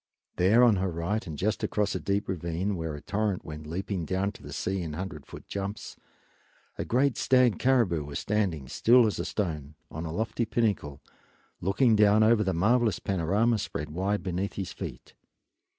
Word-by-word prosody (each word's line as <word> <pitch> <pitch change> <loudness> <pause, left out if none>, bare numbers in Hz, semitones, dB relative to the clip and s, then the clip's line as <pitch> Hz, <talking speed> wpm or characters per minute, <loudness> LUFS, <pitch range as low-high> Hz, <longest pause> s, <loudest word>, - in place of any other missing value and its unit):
There 105 +7 +5
on 115 -5 +5
her 95 +1 0
right, 90 +4 -2
and 75 -2 -6
just 105 +4 -1
across 105 -1 0
a - - -2
deep 100 +1 -1
ravine 90 +2 -2
where 80 -3 -4
a 75 - -9
torrent 100 +1 -2
went 75 -1 -8
leaping 90 +2 -3
down 95 +4 -1
to - - -15
the 70 - -10
sea 90 +8 -2
in 80 -3 -5
hundred 80 -3 -6
foot - - -11
jumps, 100 +1 -5 0.8
a - - -3
great 130 +2 +1
stag 125 -3 +3
caribou 115 - +2
was 70 0 -5
standing, 95 -10 -1
still 120 - +5
as 105 - -1
a - - -2
stone, 75 -7 -3 0.2
on 80 - -5
a - - -5
lofty 110 +6 -1
pinnacle, 100 -12 -1 0.6
looking 110 +6 +3
down 105 0 +5
over 110 -1 +4
the 95 - 0
marvelous 110 +5 +2
panorama 100 +5 +1
spread 75 -5 -4
wide 95 +5 -1
beneath 95 +1 -2
his 95 -2 -5
feet. - - -8
95 Hz, 180 wpm, -28 LUFS, 85-110 Hz, 0.8 s, There